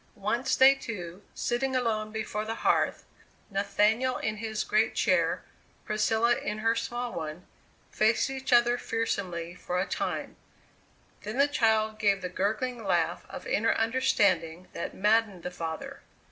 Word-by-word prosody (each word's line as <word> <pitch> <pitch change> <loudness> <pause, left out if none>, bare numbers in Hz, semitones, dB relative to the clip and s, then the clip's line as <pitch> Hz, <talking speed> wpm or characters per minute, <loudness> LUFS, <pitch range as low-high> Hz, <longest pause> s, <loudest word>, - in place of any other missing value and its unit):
Once 235 +6 0
they 265 +1 +8
two, 200 -9 -7
sitting 260 +2 -1
alone 220 -4 0
before 215 -1 -3
the 225 +1 -4
hearth - - +2 0.5
Nathaniel 210 +5 +1
in 215 0 -2
his 220 -1 -2
great 220 +1 +1
chair, - - +2 0.4
Priscilla 225 +3 +2
in 210 - -3
her 225 +1 +2
small 240 +1 -3
one 160 +2 -6 0.5
faced 220 +1 +2
each 265 0 -5
other 240 0 +5
fearsomely 180 -7 -2
for 180 0 -3
a 185 - +1
time; - - -3 0.8
then 215 +4 -5
the 280 +1 +5
child 220 -5 +1
gave 200 -3 +2
the 180 - -2
gurgling 220 +6 -2
laugh - - 0
of - - -8
inner 230 +2 +2
understanding 185 -8 +1
that 170 - -5
maddened 210 -3 +2
the 180 - -4
father. 160 -2 -6
215 Hz, 145 wpm, -28 LUFS, 195-235 Hz, 0.8 s, they